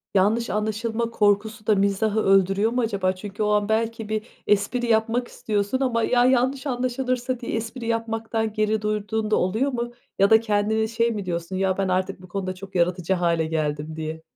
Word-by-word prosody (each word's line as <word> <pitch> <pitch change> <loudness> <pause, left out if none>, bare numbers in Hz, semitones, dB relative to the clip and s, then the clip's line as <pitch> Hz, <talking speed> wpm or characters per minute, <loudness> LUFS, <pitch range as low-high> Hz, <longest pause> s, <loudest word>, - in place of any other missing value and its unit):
yanlış 210 +4 +2
anlaşılma 220 +3 -1
korkusu 215 +1 +1
da 215 - +5
mizahı 200 +2 +1
öldürüyor 195 +3 +3
mu 250 - 0
acaba? 200 -5 0
Çünkü 205 +2 -5
o 210 - +1
an 210 0 +2
belki 225 0 -1
bir 215 0 -1 0.2
espri 210 +4 +1
yapmak 230 +2 +1
istiyorsun 210 +3 -2
ama, 235 -4 +1
"Ya, 245 +1 +3
yanlış 260 +2 +2
anlaşılırsa?" 255 0 -1
diye 240 - -5
espri 230 +2 -4
yapmaktan 225 -1 -1
geri 215 0 +1
durduğun 215 +1 -2
da - - +5
oluyor 220 +10 +1
mu? 240 -1 -3 0.3
Ya 195 - +5
da 220 - +7
kendine 220 0 +1
şey 230 +1 +1
mi 205 -3 -4
diyorsun, 170 +1 -3
"Ya 190 0 +1
ben 195 - 0
artık 185 0 -1
bu 185 - -12
konuda 185 0 -4
çok 195 +1 -11
yaratıcı 180 +1 +1
hâle 170 -2 +1
geldim." 155 -1 -2
diye? 160 0 -5
215 Hz, 185 wpm, -24 LUFS, 195-230 Hz, 0.3 s, da